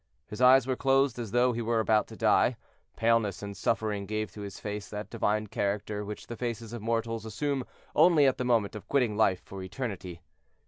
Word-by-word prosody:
His 105 Hz, -, -7 dB
eyes 130 Hz, 0 st, +7 dB
were 130 Hz, 0 st, 0 dB
closed 135 Hz, -1 st, +2 dB
as 115 Hz, -3 st, -4 dB
though 120 Hz, +3 st, +3 dB
he 120 Hz, -, -3 dB
were 115 Hz, 0 st, +1 dB
about 110 Hz, -1 st, +2 dB
to -, -, -11 dB
die, -, -, +3 dB, 0.4 s
paleness 115 Hz, -4 st, +1 dB
and 100 Hz, 0 st, -6 dB
suffering 105 Hz, -2 st, -1 dB
gave 110 Hz, +1 st, -2 dB
to 105 Hz, -, -9 dB
his 100 Hz, -1 st, -7 dB
face 105 Hz, -1 st, -5 dB
that 105 Hz, 0 st, -6 dB
divine 105 Hz, -2 st, 0 dB
character 105 Hz, +1 st, -2 dB
which 105 Hz, +1 st, -7 dB
the 120 Hz, -, -7 dB
faces 115 Hz, -1 st, -4 dB
of 120 Hz, -, -5 dB
mortals 115 Hz, 0 st, -1 dB
assume 135 Hz, +5 st, -2 dB, 0.3 s
only 165 Hz, -5 st, +6 dB
at 135 Hz, -, +2 dB
the -, -, 0 dB
moment 115 Hz, -5 st, +1 dB
of 105 Hz, -, -9 dB
quitting 125 Hz, -7 st, +1 dB
life 95 Hz, -4 st, +2 dB
for 95 Hz, -1 st, -8 dB
eternity. 95 Hz, -5 st, -6 dB
110 Hz, 200 wpm, -29 LUFS, 105-120 Hz, 0.4 s, eyes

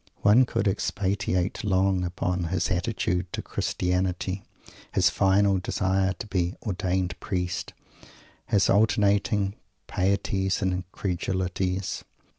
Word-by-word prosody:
_ -, -, -43 dB, 0.2 s
One 115 Hz, +5 st, +6 dB
could 105 Hz, -3 st, -1 dB
expatiate 95 Hz, -1 st, -1 dB
long 95 Hz, -2 st, +2 dB
upon 90 Hz, 0 st, -1 dB
his 90 Hz, +2 st, -1 dB
attitude 90 Hz, -2 st, -1 dB
to -, -, -3 dB
Christianity 90 Hz, +1 st, -1 dB, 0.5 s
his -, -, +3 dB
final 100 Hz, 0 st, +3 dB
desire 95 Hz, +1 st, 0 dB
to -, -, -7 dB
be 90 Hz, -3 st, -1 dB
"ordained 95 Hz, -3 st, -1 dB
Priest" 90 Hz, -2 st, -3 dB, 0.7 s
his 100 Hz, -1 st, +3 dB
alternating 100 Hz, -1 st, +3 dB, 0.3 s
pieties 95 Hz, +1 st, 0 dB
and 95 Hz, -1 st, +1 dB
incredulities. 95 Hz, 0 st, -2 dB
95 Hz, 105 wpm, -26 LUFS, 90-100 Hz, 0.7 s, One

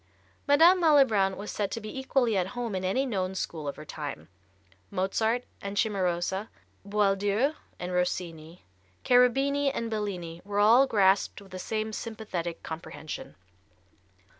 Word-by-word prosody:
Madame 330 Hz, +6 st, +6 dB
Malibran 230 Hz, -, +4 dB
was 205 Hz, +1 st, -6 dB
said 205 Hz, -2 st, -2 dB
to 230 Hz, -, -4 dB
be 215 Hz, +4 st, -6 dB
equally 265 Hz, -4 st, +1 dB
at 185 Hz, -2 st, +1 dB
home 235 Hz, -3 st, -2 dB
in 185 Hz, -1 st, -2 dB
any 225 Hz, +9 st, +1 dB
known 190 Hz, -6 st, -2 dB
school 160 Hz, -5 st, -4 dB
of 140 Hz, -, -3 dB
her 155 Hz, -, -10 dB
time. 145 Hz, -, -7 dB, 0.6 s
Mozart 220 Hz, -, 0 dB, 0.2 s
and 200 Hz, 0 st, -5 dB
Cimarosa, 190 Hz, -1 st, 0 dB, 0.3 s
Boieldieu 205 Hz, +5 st, +1 dB, 0.2 s
and 180 Hz, 0 st, -5 dB
Rossini, 175 Hz, -2 st, -3 dB, 0.4 s
Cherubini 270 Hz, +3 st, +3 dB
and 230 Hz, -4 st, -4 dB
Bellini 180 Hz, -6 st, -4 dB
were 205 Hz, +1 st, -4 dB
all 230 Hz, +6 st, +6 dB
grasped 195 Hz, -4 st, +3 dB
with 195 Hz, -1 st, -16 dB
the 185 Hz, -, -6 dB
same 220 Hz, +2 st, -3 dB
sympathetic 210 Hz, -7 st, -5 dB
comprehension. 155 Hz, -1 st, -7 dB
200 Hz, 140 wpm, -28 LUFS, 180-230 Hz, 0.6 s, Madame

